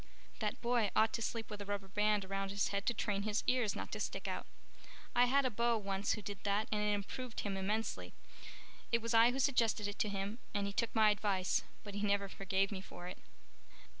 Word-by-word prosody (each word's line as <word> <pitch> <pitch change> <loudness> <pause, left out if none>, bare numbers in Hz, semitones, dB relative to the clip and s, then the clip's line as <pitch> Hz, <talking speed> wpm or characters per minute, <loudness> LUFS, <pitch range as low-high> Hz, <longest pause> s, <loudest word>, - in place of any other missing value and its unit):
That 210 -2 -1
boy 235 -3 +2
ought 220 0 +4
to 230 - -1
sleep 225 -1 -3
with 205 -1 -5
a - - -5
rubber 200 -1 -3
band 210 0 +2
around 195 0 -2
his 200 0 +1
head 200 0 -2
to 240 - +4
train 205 -2 0
his 210 +1 0
ears 250 -5 +2
not - - -5
to - - -3
stick - - -3
out. - - -3 0.7
I 245 +1 +7
had 275 +2 +3
a 255 - +1
beau 235 +1 +2
once 200 -1 0
who 215 - -5
did 200 -1 -5
that 205 +1 +1
and 210 -1 +1
it 210 0 +2
improved 230 +4 -5
him 200 -2 -2
immensely. 210 +4 -2 0.8
It 235 - +4
was 230 0 -1
I 230 +1 +7
who 250 - -2
suggested 235 -6 +2
it 205 - -6
to 210 - +2
him 200 +3 -3 0.2
and 200 -1 +1
he 200 - -3
took 230 +2 -1
my 215 -1 +6
advice, 195 -3 +1 0.2
but 205 - -8
he 205 - -3
never 200 -1 +2
forgave 195 0 0
me 190 -2 -4
for 180 -2 -9
it." 180 - -7
210 Hz, 225 wpm, -36 LUFS, 200-225 Hz, 0.8 s, I